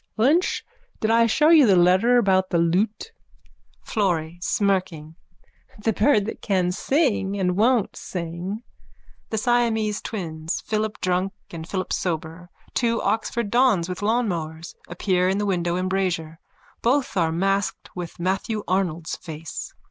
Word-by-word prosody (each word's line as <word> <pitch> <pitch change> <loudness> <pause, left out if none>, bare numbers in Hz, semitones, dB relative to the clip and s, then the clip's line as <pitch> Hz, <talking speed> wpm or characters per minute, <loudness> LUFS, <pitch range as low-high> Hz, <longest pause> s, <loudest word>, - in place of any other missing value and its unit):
Lynch, 290 +11 +2 0.3
did 220 - +1
I 230 0 +5
show 300 +7 +3
you 310 -6 +7
the 195 - +5
letter 185 +8 +4
about 190 -4 +3
the 170 - +1
lute? 190 - 0 0.7
FLORRY: 175 -6 -1
(Smirking.) 180 -6 -1 0.6
The 220 +1 0
bird 210 -1 +3
that 225 - -6
can 185 -3 +1
sing 205 - 0
and 180 -1 +1
won't 230 +2 +2
sing. 180 +5 -5 0.7
_(The 220 - -2
Siamese 225 -3 +1
twins, 160 -6 -4
Philip 215 0 -2
Drunk 185 +1 0 0.2
and 165 0 -8
Philip 185 -1 -2
Sober, 170 0 -3 0.2
two 230 -1 +1
Oxford 225 -1 -1
dons 240 -9 +3
with 180 -1 -5
lawnmowers, 175 -8 -1
appear 180 +1 +1
in 190 - +1
the 205 - 0
window 175 -3 0
embrasure. 185 -4 -1 0.4
Both 255 +1 +1
are 165 -3 +2
masked 195 +4 -1
with 175 -2 -7
Matthew 195 +4 -1
Arnold's 175 -3 -1
face.) 160 -1 -8
190 Hz, 135 wpm, -23 LUFS, 175-220 Hz, 0.7 s, you